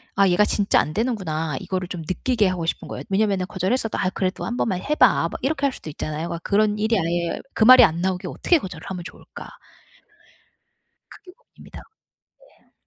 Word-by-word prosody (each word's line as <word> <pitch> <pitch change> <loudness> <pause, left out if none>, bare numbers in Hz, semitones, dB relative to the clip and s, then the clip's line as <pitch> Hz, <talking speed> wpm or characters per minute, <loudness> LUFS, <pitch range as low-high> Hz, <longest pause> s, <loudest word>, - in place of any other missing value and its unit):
'아 195 0 +4
얘가 180 +3 +4
진짜 205 -1 +2
안 155 - -5
되는구나.' 165 - -2
이거를 185 -1 -3
좀 180 -2 -6
느끼게 205 +7 0
하고 180 -3 -2
싶은 165 - -3
거예요. - - -6
왜냐하면은 195 -2 +1
거절했어도 210 +4 -1
"아 185 - 0
그래도 185 0 -3
한 240 - -4
번만 185 -7 -1
해 300 - -1
봐." - - +4
막 - - -6
이렇게 280 0 -1
할 280 - +2
수도 160 - -9
있잖아요. 155 +2 -5
그러니까 170 -1 -5
그런 210 +1 +2
일이 220 +2 +1
아예 170 +1 -2
그 - - +2
말이 255 +2 +9
안 165 -2 -2
나오게 185 0 -2
어떻게 345 - +1
거절을 180 - -9
하면 180 -2 -5
좋을까 - - -11 1.6
그게 365 - -15
고민입니다. - - -15 0.6
네. - - -27
190 Hz, 420 characters per minute, -22 LUFS, 175-225 Hz, 1.6 s, 말이